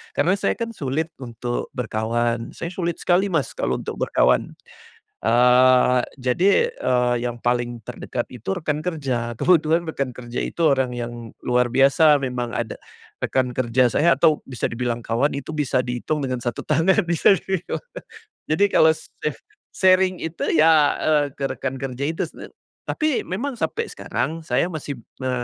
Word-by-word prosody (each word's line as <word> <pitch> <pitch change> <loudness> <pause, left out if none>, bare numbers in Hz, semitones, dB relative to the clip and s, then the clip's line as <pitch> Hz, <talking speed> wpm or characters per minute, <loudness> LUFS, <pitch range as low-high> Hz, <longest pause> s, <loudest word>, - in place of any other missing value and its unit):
Karena 185 - +3
saya, - - 0
kan, 230 -1 -4
sulit 155 - -3
untuk 120 -1 -4
berkawan. 115 0 -2
Saya 170 - -5
sulit 175 -2 -2
sekali, 185 +3 +3
Mas, 160 -9 -1
kalau - - -1
untuk - - -6
berkawan. - - +2 0.7
Eee, 125 +2 +5 0.2
jadi, 185 - +3
eee, 125 - +1
yang 120 -1 -4
paling 120 -1 -1
terdekat - - -5
itu 125 - -4
rekan 155 -5 -2
kerja, 130 -8 -2
kebetulan 165 +4 +3
rekan 140 -5 -3
kerja 120 0 -8
itu 170 - -5
orang 130 -2 +1
yang 120 -2 -6
luar 125 0 +2
biasa 140 +2 +5
memang, 125 -2 -3
ada 115 - -3 0.5
rekan 130 -1 +1
kerja 125 0 +3
saya 170 +8 +3
atau 155 -3 +2
bisa 125 -4 -3
dibilang 120 0 -2
kawan 115 +6 0
itu 140 +2 -6
bisa 135 -3 +1
dihitung 125 +5 -3
dengan 130 -2 -2
1 120 -2 -3
tangan 165 +7 +2
di 170 - +1
sini, 190 0 +2
Mas. - - -4 0.7
Jadi 195 +6 +4
kalau 160 -4 +5
saya 150 -1 -6 0.4
sharing 185 -1 +3
itu, 160 0 -3
ya, 155 -2 +5
eee, 150 -2 +3
ke 140 - -3
rekan 130 0 -4
kerja 135 0 -3
itu, 165 - -3
sebenarnya. - - -12 0.3
Tapi 310 -4 0
memang 230 +11 -3
sampai 460 +2 -2
sekarang 165 +1 -3
saya 135 +8 +1
masih 150 -2 -5 0.3
me 130 - -1
135 Hz, 160 wpm, -22 LUFS, 125-165 Hz, 0.7 s, Eee